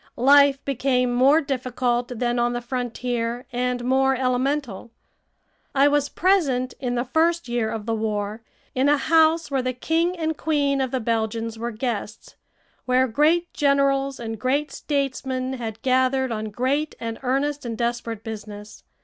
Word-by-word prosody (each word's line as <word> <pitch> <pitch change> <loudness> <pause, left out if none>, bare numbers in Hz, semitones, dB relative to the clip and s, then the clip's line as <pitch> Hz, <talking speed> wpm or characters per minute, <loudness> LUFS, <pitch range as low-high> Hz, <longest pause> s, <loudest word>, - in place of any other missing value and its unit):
Life 280 +2 +5
became 250 -2 +1
more 275 +6 +5
difficult 250 -3 -1
than 240 +1 0
on 240 0 +1
the 240 - -2
frontier, 245 -1 -3
and 250 0 -1
more 265 +1 +3
elemental. 255 -3 -1 0.9
I 275 +1 +5
was 290 0 +1
present, 285 -10 +1
in 245 -2 -2
the 240 +1 -1
first 330 +4 +1
year 240 -2 -1
of 220 -2 -5
the 225 - -1
war, 215 0 -2 0.3
in 265 +2 +2
a 295 - +4
house 320 +1 +3
where 270 -1 +1
the 255 0 -2
King 330 +7 0
and 320 -1 -1
Queen 285 -3 0
of 260 - 0
the 260 - -1
Belgians 225 0 -2
were 235 +1 -2
guests, 220 -2 -5 0.5
where 255 +1 +3
great 310 +8 +2
generals 275 -1 +1
and 225 -2 -5
great 280 +5 0
statesmen 265 -2 -2
had 225 -4 -5
gathered 260 0 +2
on 220 -1 -3
great 260 +8 -1
and 230 -1 -5
earnest 275 +3 -1
and 230 -2 -5
desperate 235 -2 -3
business. 210 -1 -8
255 Hz, 155 wpm, -23 LUFS, 235-280 Hz, 0.9 s, Life